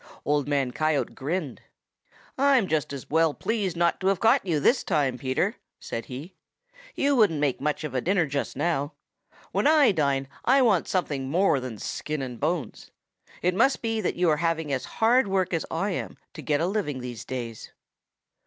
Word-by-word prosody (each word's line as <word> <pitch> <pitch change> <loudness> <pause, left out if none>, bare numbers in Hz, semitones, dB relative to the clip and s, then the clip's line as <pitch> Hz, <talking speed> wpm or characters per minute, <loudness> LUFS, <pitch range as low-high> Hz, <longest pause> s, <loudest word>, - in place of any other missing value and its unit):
Old 145 -1 +1
Man 140 -3 0
Coyote 155 +1 0
grinned. 150 0 -4 0.7
"I'm 270 -5 +4
just 155 -4 -1
as 140 -2 -7
well 160 0 +2
pleased 200 -7 -2
not 170 0 +2
to 190 - -1
have 195 -2 +2
caught 235 +4 +4
you 170 -6 0
this 240 - +3
time, 135 -4 +1
Peter," 135 - -1 0.2
said 115 -1 -5
he. 140 +8 -8 0.6
"You 280 0 +2
wouldn't 205 - +3
make 145 -3 0
much 150 +2 -1
of 150 -4 -5
a 130 - 0
dinner 180 +1 +2
just 140 -1 -3
now. 150 -3 -1 0.6
When - - +1
I 300 -6 +6
dine 140 -6 0 0.2
I 265 +2 +4
want 205 -8 +3
something 145 -8 -1
more 175 -2 +3
than 125 -4 -6
skin 150 +6 -4
and 125 -3 -6
bones. 155 -1 -3 0.5
It 180 +1 +2
must 240 +8 +2
be 225 -1 0
that 185 - -1
you 180 0 +1
are 150 - +2
having 160 -2 -1
as 130 - -2
hard 235 +1 +4
work 190 -2 0
as 165 - -1
I 195 +5 -1
am - - -4 0.2
to - - -8
get 145 0 0
a - - +2
living 180 -9 -2
these 120 -3 -6
days." 120 -4 -6
160 Hz, 190 wpm, -26 LUFS, 140-195 Hz, 0.7 s, I